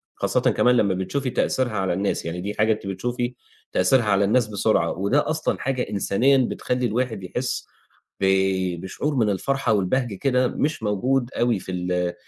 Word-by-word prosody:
خاصةً - - 0
كمان 125 0 +3
لمّا 100 -4 +2
بتشوفي 95 +9 -2
تأثيرها 125 0 0
على 95 -4 -1
الناس. 100 -1 -1
يعني 85 +2 -4
دي 100 +2 -3
حاجة 110 +1 +2
أنتِ 105 -2 -8
بتشوفي 120 +5 -3 0.4
تأثيرها 115 +7 +3
على 100 -1 +3
الناس 110 +3 +2
بسرعة 105 -4 +1
وده 100 - 0
أصلًا 155 0 -1
حاجة 130 -1 -1
إنسانيًا 115 +7 +2
بتخلّي 125 0 -1
الواحد 115 -3 -1
يحس 125 +7 -3 0.5
ب 95 - +1 0.6
بشعور 140 +10 -3
من 110 -4 +2
الفرحة 120 +3 0
والبهجة 105 +3 0
كده 125 +2 +1
مش 145 -2 -2
موجود 120 +5 0
أوي 120 -4 +2
في 95 - -8
ال 90 -1 -1
110 Hz, 165 wpm, -23 LUFS, 95-125 Hz, 0.6 s, كمان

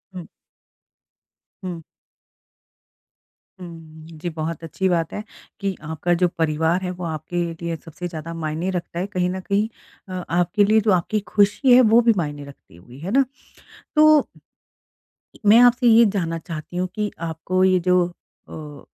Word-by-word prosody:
हुँ। 175 - -7 1.4
हुँ। 175 -3 -6 1.8
हुँ। 160 -3 -11
जी, 175 +3 -4
बहुत 160 0 -5
अच्छी 190 +4 -2
बात 165 -2 0
है 210 - -5 0.4
कि 195 -1 -2
आपका 160 +3 -1
जो - - +6
परिवार 160 +3 +1
है 180 - -2
वो 180 0 -8
आपके 165 +2 -3 0.2
लिए 170 -1 -2
सबसे 170 +2 -6
ज़्यादा 165 -1 -7
मायने 160 +2 -3
रखता 175 -1 -4
है 185 - -2
कहीं 180 -3 -1
न 185 +1 -3
कहीं। 200 +3 0 0.4
अ, 185 -1 -4
आपके 175 +4 +2
लिए 215 +2 +4
जो 210 - +2
आपकी 185 +4 +1
खुशी 210 +5 +4
है 255 - +8
वो 235 - +7
भी 230 -1 +4
मायने 145 -3 -3
रखती 140 -11 -16
होगी 120 +10 -15
है 180 +6 -5
ना? 275 +2 +4 0.7
तो 305 -1 +6 1.2
मैं 215 +3 +7
आपसे 245 0 +5
ये 230 +1 +7
जानना 165 -4 -1
चाहती 165 +1 -7
हूँ 185 +1 0
कि 210 -1 -2
आपको 170 +3 -1
ये 185 -1 +4
जो 180 0 +5 0.5
अ, 150 -2 -9
175 Hz, 160 wpm, -22 LUFS, 160-200 Hz, 1.8 s, है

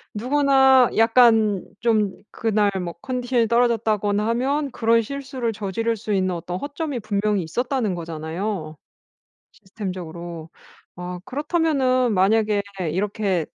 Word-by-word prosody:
누구나 265 +1 +4
약간 225 -3 +4 0.2
좀 215 -4 +2 0.2
그날 210 -2 +1
뭐 170 -1 -5
컨디션이 250 -2 0
떨어졌다거나 220 -3 +1
하면 275 +4 0
그런 230 -1 +2
실수를 260 -2 -4
저지를 215 +3 -2
수 215 0 -3
있는 185 -1 0
어떤 175 +1 -5
허점이 285 - -4
분명히 205 -2 0
있었다는 240 - -1
거잖아요, 165 +1 -4 0.8
시스템적으로. 175 -4 -7 0.4
아 180 0 -6
그렇다면은 270 -3 +1
만약에 210 +2 +2 0.3
이렇게 195 -2 -1
220 Hz, 290 characters per minute, -22 LUFS, 190-250 Hz, 0.8 s, 누구나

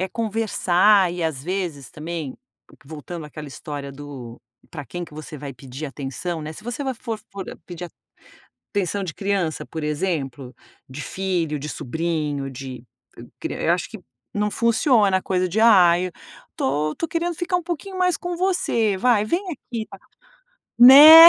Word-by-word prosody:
é 190 - 0
conversar 205 -3 +3
e, 175 -1 -2
às 150 -5 -2
vezes 170 -6 -3
também, 155 -2 -5 0.5
voltando 155 +2 -7
àquela 150 0 -8
história 140 0 -6
do 135 -5 -9 0.3
para 145 -4 -6
quem 175 +4 -5
que 165 - -16
você 155 0 -8
vai 140 0 -6
pedir 135 +4 -7
atenção, 145 +5 -4
né, 155 +1 -5
se - - -11
você 245 +4 -3
vai 265 -1 -1
for 230 -1 -5
for 195 -1 -5 0.2
pedir 175 0 -6 0.9
atenção 200 0 0
de 175 -4 -4
criança, 195 -5 -1
por 160 -2 -6
exemplo, 145 -5 -2 0.4
de 130 +3 -6
filho, 175 -6 -1
de 150 +2 -5
sobrinho, 150 -1 -2
de 130 -2 -8 0.6
cri - - -3
eu - - +1
acho - - -2
que - - -9 0.3
não 210 0 +1
funciona 230 -4 +3
a - - -3
coisa 185 -1 0
de 205 +6 0
"Ai, 185 -5 +6 0.4
estou 150 +3 0
estou 330 - -3
querendo 340 +1 -1
ficar 355 +3 -1
um 355 - -5
pouquinho 360 +3 -5
mais 360 -2 +2
com 350 0 -4
você, 235 - +1
vai. 225 0 +4
vem 345 - 0
aqui 235 -7 -5
está." - - -12 0.8
Né. 300 +7 +12
175 Hz, 165 wpm, -23 LUFS, 150-225 Hz, 0.9 s, Né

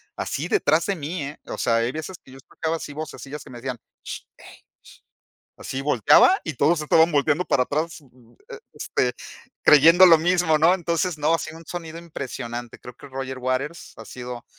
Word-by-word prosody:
así 150 +5 -3
detrás 155 -1 +2
de 200 - 0
mí, 160 +2 -5
eh, 140 +2 -7
o - - -6
sea 115 - +2
hay 115 +1 0
veces 160 +5 -7
que 130 - -17
yo 135 - -12
escuchaba 160 +5 -4
así 145 - -8
vocesillas 150 -1 -7
que 140 - -14
me 120 - -9
decían: 125 0 -5 0.3
"Sh - - -7 0.2
ey - - -15 0.9
sh", - - - 0.2
así 130 - -5
volteaba 145 - +5
y 160 - -4
todos 155 +6 +2
estaban 160 +2 +4
volteando 150 +4 +2
para 130 - +2
atrás, 160 +5 -3 0.7
este, 125 - -1 0.5
creyendo 165 +5 +8
lo 165 -2 +7
mismo, 175 -1 +2
¿no? 165 +4 +5
Entonces 170 -1 -1
no, 150 +2 +2
ha - - +1
sido 160 0 -7
un 165 - -15
sonido 165 -1 -7
impresionante 120 -7 -7
creo 125 - -11
que - - -14
Roger 130 0 -6
Waters 130 +6 -3
ha - - -10
sido 125 -1 -8
150 Hz, 190 wpm, -23 LUFS, 130-165 Hz, 0.9 s, creyendo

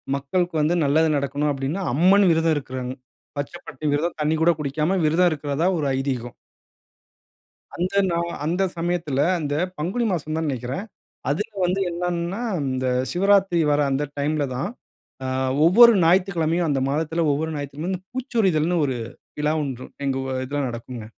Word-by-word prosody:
மக்களுக்கு 165 +5 -1
வந்து 160 +4 +2
நல்லது 155 +3 +3
நடக்கணும் 145 +1 -1
அப்பிடீன்னு, 140 +7 -2
அம்மன் 190 +7 +5
விரதம் 165 -1 +2
இருக்குறாங்க. 130 -2 -5 0.4
பச்ச 145 - -3
பட்டினி 150 +2 -3
விரதம். 165 +4 -1
தண்ணீ 150 +1 +2
கூட 170 +1 +5
குடிக்காம, 150 +6 0
விரதம் 175 +4 +4
இருக்குறதா 145 +2 -1
ஒரு 150 - -1
ஐதீகம். 130 -3 -3 1.4
அந்த 185 +3 -2
நா 170 - 0 0.3
அந்த 175 +5 0
சமயத்ல 165 -5 -1 0.2
அந்த 145 -2 -2 0.2
பங்குனி 190 +11 -1
மாசம் 155 -2 -3
தான்னு 160 -2 -1
நெனைக்கிறேன். 130 - -4 0.4
அதுல 190 +10 -1
வந்து 180 +2 +1
என்னன்னா, 175 +3 -2 0.3
இந்த 130 0 -1 0.2
சிவராத்திரி 195 -1 +3
வர்ற 145 0 +3
அந்த 135 +2 0
டைம்ல 150 +1 0
தான். 135 +8 -2 0.6
அ - - -2 0.4
ஒவ்வொரு 235 +7 +8
ஞாயித்துக்கிழமையும் 175 -2 +2
அந்த 140 -2 +1
மாதத்துல 160 +3 0
அ - - +3
ஒவ்வொரு 160 +3 -2
ஞாயிற்றுக்கிழமையும்,"பூச்சொரிதல்ன்னு" 180 - -1
ஒரு 130 - -2 0.4
விழா 150 +1 +1
ஒன்று, 130 -3 -5 0.2
எங்க 135 -1 0 0.3
இதுல 145 +2 -2
நடக்குங்க. 120 -1 -7
155 Hz, 140 wpm, -23 LUFS, 140-175 Hz, 1.4 s, ஒவ்வொரு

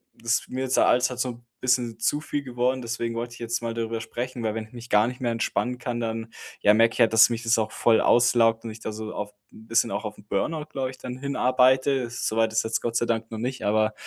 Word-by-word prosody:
das 115 -1 0
mir 130 +1 -3
ist 130 - 0
der - - +5
Alltag 125 0 +2
so 125 - 0
'n 120 0 -10 0.2
bisschen 125 -3 +1
zu 145 +6 0
viel 145 -1 -3
geworden. 125 0 -1
Deswegen 115 0 -3
wollte 120 +1 -4
ich - - -14
jetzt 115 0 -2
mal 115 -1 -3
darüber 115 0 -3
sprechen, 120 +1 -5
weil, 110 -1 0
wenn 110 -1 -4
ich 110 - -24
mich 120 0 -10
gar 105 +2 +4
nicht 125 0 -6
mehr 120 -2 0
entspannen 125 +2 -1
kann, 120 -2 -3
dann, 115 0 -3 0.3
ja, 105 - +6
merke 115 0 +4
ich - - -8
halt, 110 -1 +4
dass 110 +2 +7
mich 115 0 -3
das 115 0 +3
auch 110 0 -1
voll 115 -2 +3
auslaugt 120 -2 +4
und - - -4
ich 110 - -11
da 110 - -5
so 110 0 -6
auf 105 0 -5 0.2
'n 110 +1 -15
bisschen 115 +1 +2
auch 105 +3 -3
auf 105 - -6
'n 105 - -16
Burnout, 150 +10 -2
glaube 130 -2 -2
ich, 130 - -13
dann 125 0 -6
hinarbeite. 130 -1 +2
So 115 -1 -2
weit 110 -1 +2
ist 110 - +2
jetzt 110 0 -1
Gott 115 -1 -3
sei 120 - +1
Dank 115 0 -2
noch 110 - -5
nicht, 130 +2 -3
aber, 110 +1 +2
115 Hz, 270 wpm, -25 LUFS, 115-125 Hz, 0.3 s, dass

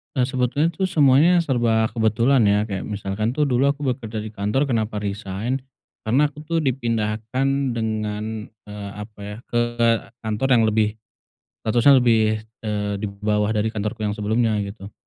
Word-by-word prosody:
Eee, 130 - +2
sebetulnya 130 +5 +1
tuh 190 +2 -1
semuanya 160 +3 +5
serba 115 -5 +1
kebetulan 115 +4 +2
ya 105 +1 +3
kayak 100 -3 -4
misalkan 105 +3 -2
tuh 150 - +2
dulu 135 0 +2
aku 145 +1 -1
bekerja 115 -4 -3
di 110 - -7
kantor 105 +7 0
kenapa 115 -6 -1
resign? 105 +4 -3 0.5
Karena 145 +6 +3
aku 150 - -13
tuh 165 0 0
dipindahkan 120 +2 -1
dengan, 110 -1 -3
eee, 105 -2 -10
apa 105 0 -9
ya 105 +1 -7
ke 120 - -1 0.6
kantor 110 +4 -1
yang 115 - +4
lebih 110 0 +1 0.7
statusnya 120 +5 +5
lebih, 110 -3 +3 0.2
eee, 105 -2 -2
di 105 - -2
bawah 105 +1 0
dari 110 +1 0
kantorku 110 +1 -3
yang 105 - 0
sebelumnya 110 +1 0
gitu, 100 0 -7
110 Hz, 155 wpm, -22 LUFS, 105-130 Hz, 0.7 s, semuanya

